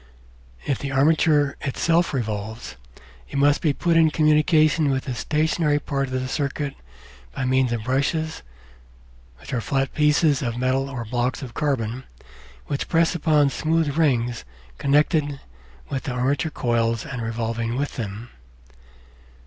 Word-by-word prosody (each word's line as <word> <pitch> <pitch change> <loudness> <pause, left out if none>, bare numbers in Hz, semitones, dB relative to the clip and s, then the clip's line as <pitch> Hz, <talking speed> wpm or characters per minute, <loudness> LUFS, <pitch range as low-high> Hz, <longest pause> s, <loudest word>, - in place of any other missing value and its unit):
If 140 - -1
the 140 - -4
armature 145 0 +3
itself 165 +5 +1
revolves, 110 -3 -4 0.5
it - - -4
must 145 +1 +3
be 155 - +2
put 170 +4 0
in 165 -1 +5
communication 155 0 +3
with 135 -1 0
the 130 - -4
stationary 155 +3 +1
part 140 -2 -2
of 130 0 -2
the 130 - -3
circuit 140 0 -2 0.6
by 130 - -2
means 130 -1 +2
of 115 -2 -2
brushes 145 +6 -1 1.0
flat 135 +2 -1
pieces 150 -1 +3
of 120 -3 -2
metal 130 +2 0
or 125 -4 -5
blocks 125 +4 -2
of 125 -3 -8
carbon 130 -4 -2 0.6
which 140 - -3
press 165 -1 +3
upon 150 -4 +2
smooth 160 -1 0
rings 125 - +1 0.4
connected 145 0 +2 0.5
with 135 -2 -4
the 125 - -2
armature 135 +5 0
coils 115 -4 0
and 125 -3 -5
revolving 115 0 -2
with 145 +1 -2
them. 110 +1 -6
140 Hz, 135 wpm, -23 LUFS, 125-150 Hz, 1.0 s, in